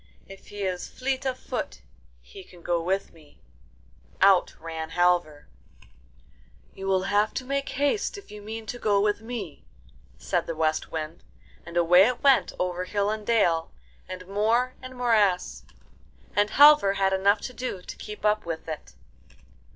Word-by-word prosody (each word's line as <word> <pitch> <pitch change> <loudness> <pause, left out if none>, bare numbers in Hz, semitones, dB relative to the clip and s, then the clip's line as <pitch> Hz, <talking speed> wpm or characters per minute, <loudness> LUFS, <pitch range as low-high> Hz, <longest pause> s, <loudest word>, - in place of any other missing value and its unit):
If 195 0 -13
he 205 0 -6
is 185 -2 -3
fleet 265 +1 -3
of 255 -1 -2
foot - - -5 0.4
he 190 - -12
can 180 -2 -17
go 170 -1 0
with 190 +4 -2
me.' 155 -3 -20 0.8
Out 195 -1 +4
ran 160 -1 -6
Halvor. 175 -4 +1 1.3
'You 195 0 -7
will 190 -1 +2
have 205 +2 +1
to 260 - -3
make 275 +1 -2
haste 285 +10 -1
if 400 - -13
you 210 0 -9
mean 220 +2 -7
to 245 - -6
go 205 -3 +2
with 205 +1 +1
me,' 220 -9 -7 0.5
said - - -2
the 165 - -3
West 155 0 -1
Wind; 160 +1 -5 0.4
and 170 0 -5
away 180 +3 +6
it 250 +2 -3
went 275 -2 +4
over 180 0 -2
hill 205 +2 0
and 215 -1 -5
dale, 170 -8 +2 0.4
and 185 0 -7
moor 225 +6 +1
and 255 0 -9
morass, 215 -7 +1 0.7
and 205 0 +3
Halvor 290 -8 +7
had 195 -1 +1
enough 200 +2 +3
to 250 - -6
do 245 -8 -5
to - - -8
keep 210 0 -8
up 210 0 +2
with 165 -1 -6
it. 150 - -7
200 Hz, 165 wpm, -26 LUFS, 175-225 Hz, 1.3 s, Halvor